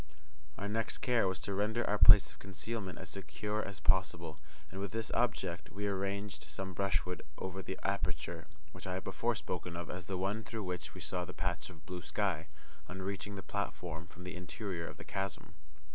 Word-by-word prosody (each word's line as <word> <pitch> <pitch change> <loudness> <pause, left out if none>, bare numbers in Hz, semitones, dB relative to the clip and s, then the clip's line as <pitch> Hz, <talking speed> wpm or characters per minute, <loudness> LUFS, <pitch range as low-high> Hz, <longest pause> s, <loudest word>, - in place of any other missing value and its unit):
Our 100 - -2
next 110 +2 0
care 120 -5 +4
was 95 -1 0
to 100 - -2
render 105 +4 +2
our 105 0 +3
place 100 - +11
of - - -17
concealment 100 +1 -3
as 95 - -6
secure 100 +4 -2
as 100 -6 -5
possible, 85 -2 +3 0.3
and 95 - -5
with 100 - -3
this 115 0 -1
object, 95 -7 +1
we 105 +1 -2
arranged 100 +1 -1
some 95 -1 -4
brushwood 90 -1 +1 0.2
over 95 0 -3
the 95 - -4
aperture 100 +1 0 0.2
which - - -8
I - - 0
have - - -2
before - - +1
spoken 85 -1 -3
of 85 - -3
as 90 -2 -5
the 95 - -1
one 100 +4 0
through 110 -1 -3
which 90 -1 -3
we - - -7
saw 90 -1 0
the 90 +1 -7
patch 85 +1 -1
of 80 -4 -13
blue 90 -1 -4
sky, 85 -6 0 0.4
on 95 +1 -4
reaching 100 +1 -2
the 95 - -5
platform 85 -5 -2
from 90 0 -11
the 90 0 -4
interior 90 -1 -3
of - - -7
the - - -7
chasm. 95 -1 -3
95 Hz, 200 wpm, -36 LUFS, 90-100 Hz, 0.4 s, place